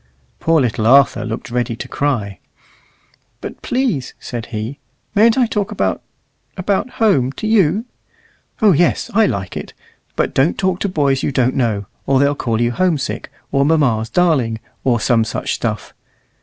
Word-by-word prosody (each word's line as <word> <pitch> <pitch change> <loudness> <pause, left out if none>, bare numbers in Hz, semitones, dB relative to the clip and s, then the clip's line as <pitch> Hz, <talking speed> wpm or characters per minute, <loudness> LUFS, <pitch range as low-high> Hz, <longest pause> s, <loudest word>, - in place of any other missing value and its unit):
Poor 165 0 +3
little 115 -4 0
Arthur 135 -2 +5
looked 115 +2 -5
ready 120 -1 -1
to - - -7
cry. 115 -9 -2 1.0
"But, - - -8
please," 240 - -1
said 120 -1 -6
he, 115 +5 -5 0.3
"mayn't 225 +3 +4
I 255 - +4
talk 210 -3 -2
about 95 -3 -1 0.6
about 195 +6 0
home 175 - +3
to 175 - -6
you?" 210 -1 +2 0.8
"Oh 210 - +7
yes; 175 +8 +1
I 220 0 +4
like 95 - -3
it. - - -7 0.4
But - - 0
don't 135 +5 +2
talk 185 -2 0
to 200 - -1
boys 140 -6 +1
you - - -1
don't 130 -1 +1
know, 110 -6 0 0.2
or 135 -1 +3
they'll 140 +1 +3
call 115 -5 -2
you 120 0 +1
home 180 +3 +1
sick, 130 - -4 0.2
or 140 0 +3
mamma's 135 -8 +2
darling, 135 -11 +1 0.2
or 120 -3 +2
some 115 0 +2
such 110 - -3
stuff. - - -3
140 Hz, 165 wpm, -18 LUFS, 115-185 Hz, 1.0 s, Oh